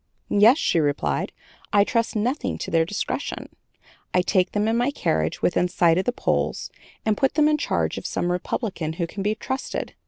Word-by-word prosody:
'Yes,' 220 +7 +6
she 175 - +1
replied, 140 - 0 0.4
'I 205 -1 +6
trust 230 +2 0
nothing 250 +5 -1
to - - -5
their 165 -1 +3
discretion. 205 +4 -4 0.7
I 180 - +4
take 185 -1 +1
them 210 +1 +1
in 225 - +1
my 245 +3 +2
carriage 80 - -1
within 180 0 +2
sight 175 -1 +3
of 190 - -1
the 245 - +2
polls - - -1 0.3
and 215 -1 +2
put 270 +5 +1
them 300 -1 +4
in 305 0 +2
charge - - -1
of - - -6
some 175 - -1
Republican 180 -3 -2
who 170 +1 -2
can 195 +4 -7
be 210 +2 0
trusted. 260 +4 -4
205 Hz, 190 wpm, -24 LUFS, 175-240 Hz, 0.7 s, Yes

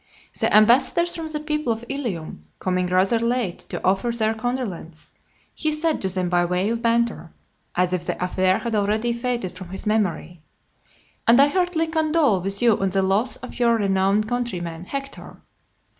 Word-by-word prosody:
The - - +1
ambassadors 260 +10 +4
from 330 -2 -4
the 310 -1 -2
people 300 -4 -1
of 225 +1 -4
Ilium 195 - -5
coming 180 -1 -1
rather 185 +5 +2
late 235 -5 -1
to - - -5
offer 195 +5 +2
their 220 -2 +1
condolence, 220 -9 -5 0.4
he 310 - -1
said 305 +1 +1
to 190 - -1
them 185 -1 -1
by 175 0 +2
way 180 +4 0
of 230 0 -2
banter, 230 -7 0 0.4
as 180 0 +1
if 175 -1 -2
the - - -2
affair 185 +1 +2
had 235 -2 -4
already 215 +3 +1
faded 235 -5 -2
from 185 -1 -10
his 190 +4 -6
memory, 180 -6 -1 0.9
"And 235 +2 +6
I 280 +1 +7
heartily 355 -1 +1
condole 315 - +2
with 195 +4 -3
you 230 -4 +4
on 195 - +1
the 195 +1 +1
loss 200 +7 +1
of 250 - -10
your 235 -1 +4
renowned 200 0 +1
countryman, 180 -9 -3
Hector." 275 +5 -7
220 Hz, 175 wpm, -23 LUFS, 185-250 Hz, 0.9 s, I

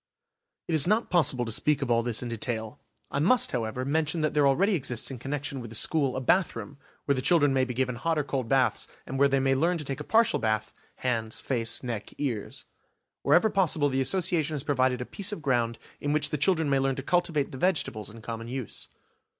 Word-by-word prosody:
It 170 - -2
is 155 0 +3
not 215 +4 +1
possible 145 -8 +3
to 115 - -4
speak 145 +5 +1
of 125 - -2
all 115 0 +3
this 120 0 -2
in 120 - -4
detail. 110 -1 -3 0.3
I 140 - -1
must, 220 - +3
however, 120 +1 -2
mention 155 +3 0
that 155 - 0
there 145 -2 +4
already 190 +10 +3
exists 130 -7 -1
in 130 - -7
connection 140 +1 -4
with 115 - -8
the 115 - -8
school 140 +2 +2
a 130 - -2
bathroom, 150 -1 0 0.3
where 140 - +2
the 130 - -2
children 145 0 +3
may 130 -1 +2
be 125 -1 -5
given 125 -1 -1
hot 165 +6 -1
or 150 - +1
cold 130 -4 -3
baths 135 -1 +2 0.2
and 135 - -4
where 140 - +6
they 135 0 +1
may 135 0 +2
learn 170 +6 +1
to 155 - -4
take 135 0 -4
a - - -5
partial 225 +6 +3
bath, 110 -1 -1 0.2
hands, 115 -3 -2
face, 115 -3 -2
neck, 115 -4 -5
ears. 120 -8 -4 0.6
Wherever 215 +5 +4
possible 160 -6 +2
the 135 0 0
Association 165 0 +1
has 140 - -3
provided 130 -3 +1
a - - -3
piece 200 - -1
of 175 -7 -6
ground 120 -4 +1 0.2
in 145 0 -1
which 150 -1 +1
the 150 - 0
children 160 0 +2
may 140 -1 +2
learn 135 0 0
to 135 - -5
cultivate 165 -3 0
the 130 - -8
vegetables 150 - 0
in 110 +1 -13
common 115 0 -6
use. 125 -2 -5
135 Hz, 225 wpm, -27 LUFS, 120-155 Hz, 0.6 s, where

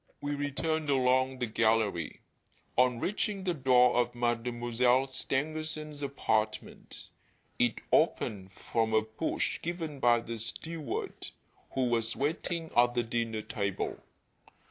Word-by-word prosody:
We 145 0 -2
returned 145 +2 -1
along 130 -1 +3
the 125 - -1
gallery. 110 -6 +1 0.5
On 125 -1 +3
reaching 200 - -1
the 180 -2 +1
door 125 -4 +4
of 120 0 +1
Mademoiselle 120 +1 +1
Stangerson's 150 +3 -3
apartment, 110 -6 -2 0.5
it 120 -2 +3 0.2
opened 95 -2 +1
from 110 +3 -1
a 110 - +4
push 110 +9 -2
given 165 -4 -4
by 120 -2 +4
the 115 -1 -6
steward 155 +7 -5 0.5
who 130 -1 +2
was 115 -1 0
waiting 165 +3 -2
at 120 0 +4
the 120 - +2
dinner 115 -1 -2
table. 100 -2 -2
125 Hz, 120 wpm, -31 LUFS, 115-145 Hz, 0.5 s, door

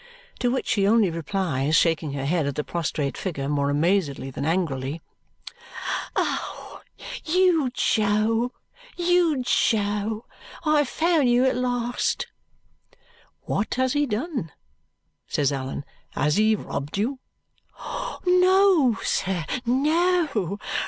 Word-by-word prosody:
To 245 - +1
which 260 +2 -1
she 200 -2 +2
only 215 -4 +4
replies, 160 -4 -1
shaking 165 -4 +2
her 140 -1 -3
head 160 0 +1
at 140 - -3
the 150 - -1
prostrate 155 -4 -2
figure 145 -8 -4
more 140 -1 0
amazedly 145 -3 0
than 140 +2 -4
angrily, 155 -4 -1 1.2
"Oh, - - -3 0.4
you 340 -4 +3
Jo, 220 +1 +1 0.5
you 345 -6 +2
Jo. 210 -1 +1 0.4
I 305 -1 +4
have 290 -4 +1
found 320 -5 +2
you 245 +2 +4
at 260 - +2
last!" 245 -1 -1 1.2
"What 200 - -2
has 260 0 +1
he 290 0 +1
done?" 240 - -3 0.8
says 145 -2 +1
Allan. 135 +1 -4 0.3
"Has 150 +3 +1
he 215 +1 +4
robbed 145 -5 -5
you?" 255 +6 -1 1.1
"No, 365 - +4
sir, 180 -4 -1 0.2
no. 295 - +1
215 Hz, 115 wpm, -24 LUFS, 160-265 Hz, 1.2 s, only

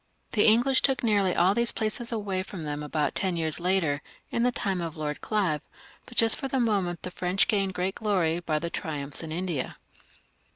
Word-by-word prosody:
The 210 - +4
English 245 +5 +4
took 270 -2 +1
nearly 200 -5 +2
all 185 +3 +4
these 235 +2 +1
places 225 +2 -1
away 200 -4 -2
from 185 -3 -7
them 150 -1 -4
about 150 0 -1
ten 185 -3 -1
years 160 -1 +1
later, 170 -5 +1 0.3
in 235 - 0
the 250 +1 +3
time 195 -6 -2
of 165 -1 -5
Lord 150 -1 -3
Olive, 185 -9 0 0.5
but 245 - -13
just 225 +3 +4
at 270 - -1
the 265 - 0
moment 195 -7 0
the 180 - -4
French 180 +2 +1
gained 195 -3 0
great 185 +2 -1
glory 180 -7 0
by 165 -3 -1
their 170 +2 -3
triumphs 145 -3 0
in 160 -2 -7
India. 170 -5 -3
185 Hz, 200 wpm, -27 LUFS, 160-215 Hz, 0.5 s, The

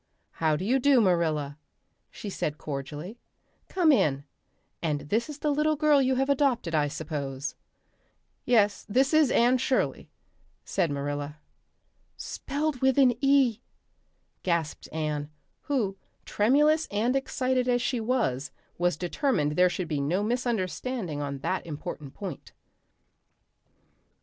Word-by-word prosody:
"How 155 -2 +1
do 180 - -3
you 255 +5 +2
do, 275 0 +5
Marilla?" 160 -7 +1 0.5
she - - -9
said 155 -6 -3
cordially. 150 - -6 0.5
"Come 350 -4 +4
in. 140 - +2 0.6
And 150 -3 -1
this 230 +7 +1
is 295 - -6
the 300 0 0
little 305 +2 +2
girl 300 -1 +4
you 260 0 +2
have 270 +1 +1
adopted, 265 - +1
I 150 -2 +2
suppose?" 140 -2 -4 0.9
"Yes, 210 -4 +3
this 265 +7 +2
is 310 -4 +5
Anne 245 +2 +4
Shirley," 260 +1 0 0.6
said 180 -4 0
Marilla. 145 +1 -3 0.8
"Spelled 290 -1 -3
with 265 0 +3
an 260 -3 +6
E," 270 -5 +4 0.8
gasped 170 -4 -2
Anne, 150 -2 -2 0.4
who, 235 -10 0 0.3
tremulous 295 +8 +3
and 225 +5 0
excited 255 -1 0
as 245 0 +3
she 250 - 0
was, 220 - 0 0.3
was 175 -2 +1
determined 175 - 0
there 180 +4 +4
should 180 0 -3
be 150 -3 -1
no 175 +8 0
misunderstanding 230 - -2
on 140 -1 -3
that 185 - -1
important 150 -3 -7
point. 185 -8 -7
205 Hz, 130 wpm, -27 LUFS, -, 0.9 s, an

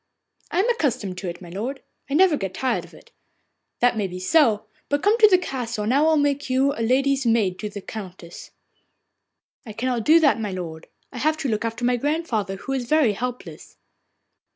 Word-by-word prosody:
'I 360 - +1
am 455 - 0
accustomed 245 - -2
to 185 - -4
it, 170 - -8
my 175 - -10
lord, 240 +9 -5 0.3
and 280 - +1
I - - +8
never 360 -5 +4
get 195 -7 -4
tired 260 - -1
of - - -19
it.' - - -18 0.7
'That 245 -1 +3
may 205 -3 0
be 180 0 -7
so; 220 - +3 0.2
but 285 0 0
come 415 +2 +4
to 430 - +8
the 375 -3 +5
castle, 245 -10 -4
and 220 +4 0
I 280 - +4
will 315 0 +4
make 285 -1 0
you 265 +2 +2
lady's 270 +4 +1
maid 215 -6 +1
to 210 - -4
the 205 0 -8
Countess.' 185 -5 -9 1.2
'I 215 - -7
cannot 240 +1 -2
do 320 +6 +6
that, 300 -7 +3
my 210 -2 -3
lord. 165 -4 -7 0.2
I 250 - -7
have 310 +4 +1
to 285 -4 -2
look 215 -1 -1
after 230 +1 -3
my 245 0 +2
grandmother, 250 - -1
who 200 - -7
is 260 -2 -2
very 300 -7 +3
helpless. 245 +4 -7
245 Hz, 205 wpm, -23 LUFS, 210-285 Hz, 1.2 s, I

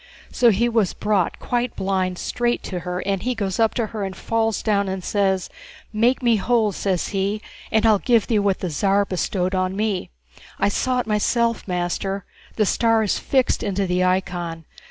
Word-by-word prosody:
So 240 - +4
he 230 +3 +2
was 225 -5 +1
brought, 205 -4 0
quite 245 0 -2
blind, 185 -1 -1
straight 240 +5 -1
to 180 - -4
her, 180 +1 -4
and 195 -1 0
he 250 +3 -1
goes 200 -3 -2
up 225 -1 +3
to 235 - 0
her 215 -2 -3
and 190 -1 -4
falls 225 +1 -1
down 200 -3 +1
and 190 -1 -4
says, 190 -2 +1 0.5
'Make 240 +5 +2
me 235 -2 +4
whole,' 220 0 +2
says 190 -1 -1
he, 200 +1 -1 0.3
'and 220 0 +3
I'll 215 -3 +5
give 235 -2 +3
thee 220 -3 +1
what 200 -2 0
the 180 - -2
Tsar 200 +6 +2
bestowed 185 0 -1
on 185 0 0
me.' 210 -2 -1 0.5
I - - +2
saw 250 +4 0
it - - -8
myself, 230 +2 0
master, 180 +2 -2 0.3
the 215 - +2
star 225 +2 +2
is 205 - 0
fixed 260 -2 +1
into 200 -1 -1
the 180 0 +1
icon. 175 -3 -1
200 Hz, 190 wpm, -22 LUFS, 185-225 Hz, 0.5 s, I'll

